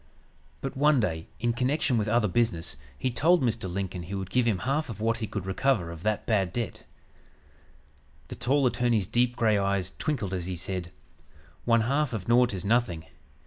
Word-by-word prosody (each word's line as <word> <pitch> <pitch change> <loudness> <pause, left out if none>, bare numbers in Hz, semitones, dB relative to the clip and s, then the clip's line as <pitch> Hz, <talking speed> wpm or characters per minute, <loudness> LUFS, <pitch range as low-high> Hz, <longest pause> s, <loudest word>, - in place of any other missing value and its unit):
"But 135 - -4
one 145 0 +4
day, 80 -7 -1
in 120 +1 +1
connection 130 +2 +1
with 110 -2 +1
other 110 0 +3
business, 90 - 0 0.2
he 130 - -1
told 165 +6 +3
Mr. 115 -6 -1
Lincoln 95 -1 -3
he 90 +4 -6
would 95 -2 -5
give 125 -2 +2
him 105 -5 +2
half 140 +2 0
of 110 - -6
what 115 +1 +1
he 110 -3 -3
could 100 -3 -5
recover 95 -2 0
of 85 -1 -9
that 110 +2 -1
bad 95 -6 +1
debt. 120 +1 -4 1.4
The - - -6
tall 135 +4 +1
attorney's 120 -4 +2
deep 120 +4 +1
gray 110 -4 +3
eyes 100 -2 -1
twinkled 115 - -2
as 90 -2 -3
he 95 - -3
said, 90 0 -3 0.7
'One 115 -1 +4
half 140 +3 0
of 105 -5 -4
nought 120 +1 +4
is 95 -2 -5
nothing. 100 -8 +1
110 Hz, 185 wpm, -27 LUFS, 95-125 Hz, 1.4 s, one